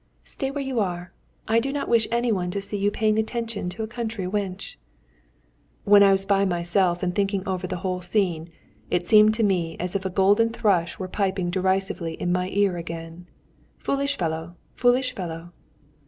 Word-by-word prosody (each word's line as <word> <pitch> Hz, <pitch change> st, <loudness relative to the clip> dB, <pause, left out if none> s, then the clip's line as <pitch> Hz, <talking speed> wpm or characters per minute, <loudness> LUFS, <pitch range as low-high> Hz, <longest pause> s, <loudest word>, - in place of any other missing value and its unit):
"Stay 270 Hz, -, -4 dB
where 280 Hz, 0 st, -3 dB
you 265 Hz, -3 st, -2 dB
are. 175 Hz, -3 st, -3 dB, 0.3 s
I 225 Hz, +1 st, +4 dB
do 270 Hz, +4 st, -2 dB
not 285 Hz, 0 st, -3 dB
wish 230 Hz, -2 st, +3 dB
any 235 Hz, +1 st, +1 dB
one 180 Hz, -4 st, -1 dB
to 200 Hz, -, -2 dB
see 200 Hz, +1 st, -5 dB
you 200 Hz, 0 st, +1 dB
paying 215 Hz, +1 st, +1 dB
attention 225 Hz, -4 st, -3 dB
to 220 Hz, +5 st, -5 dB
a -, -, -3 dB
country 225 Hz, -3 st, -4 dB
wench." 195 Hz, 0 st, -4 dB, 1.1 s
When 205 Hz, 0 st, +6 dB
I 200 Hz, -1 st, +7 dB
was 195 Hz, 0 st, +2 dB
by 200 Hz, 0 st, +3 dB
myself 175 Hz, 0 st, +1 dB
again 180 Hz, -, +1 dB
and 180 Hz, -, -5 dB
thinking 200 Hz, -1 st, 0 dB
over 185 Hz, -1 st, -2 dB
the 185 Hz, -, -3 dB
whole 185 Hz, -1 st, -1 dB
scene, 175 Hz, -3 st, -1 dB, 0.4 s
it 175 Hz, 0 st, 0 dB
seemed 215 Hz, +2 st, +6 dB
to 225 Hz, -, 0 dB
me 175 Hz, -5 st, 0 dB
as 180 Hz, +2 st, -3 dB
if 195 Hz, -, -1 dB
a 190 Hz, -, -2 dB
golden 200 Hz, +4 st, +3 dB
thrush 205 Hz, -8 st, +1 dB
were 185 Hz, -, -4 dB
piping 190 Hz, -2 st, -1 dB
derisively 190 Hz, -2 st, -1 dB
in 175 Hz, -, -2 dB
my 180 Hz, +1 st, 0 dB
ear 195 Hz, -2 st, +1 dB
again 165 Hz, +1 st, -7 dB, 0.5 s
"Foolish 280 Hz, +1 st, -1 dB
fellow! 160 Hz, 0 st, -3 dB, 0.2 s
Foolish 250 Hz, +1 st, +2 dB
fellow!" 170 Hz, -3 st, -6 dB
195 Hz, 190 wpm, -24 LUFS, 180-220 Hz, 1.1 s, I